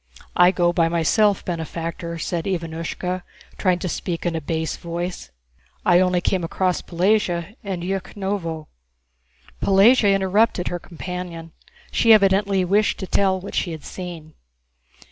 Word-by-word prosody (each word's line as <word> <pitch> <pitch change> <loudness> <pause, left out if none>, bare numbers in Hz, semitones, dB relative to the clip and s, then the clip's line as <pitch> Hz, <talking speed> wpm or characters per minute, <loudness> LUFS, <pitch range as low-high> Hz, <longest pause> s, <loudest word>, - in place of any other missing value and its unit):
"I 180 0 +7
go 175 -2 +2
by 165 -2 +2
myself, 190 +5 +2
benefactor," 170 0 -4
said 165 0 -3
Ivánushka, 175 0 -3 0.4
trying 185 -3 +2
to 180 - -4
speak 170 0 -4
in 170 -1 0
a 160 - -2
bass 160 +1 -2
voice. 175 - -5 0.6
"I 175 -1 +6
only 180 -1 +2
came 185 0 0
across 180 +2 0
Pelagéya 180 0 0
in 190 -4 -4
Yúkhnovo...." 190 -3 -3 1.0
Pelagéya 200 +1 +5
interrupted 195 0 +2
her 175 - -3
companion; 170 -1 -7 0.4
she 230 -1 +5
evidently 195 -2 +3
wished 205 +4 +2
to 190 - -5
tell 190 0 +1
what 195 +2 -8
she 175 - -1
had 155 - -8
seen. 170 -4 -8
180 Hz, 135 wpm, -22 LUFS, 170-195 Hz, 1.0 s, I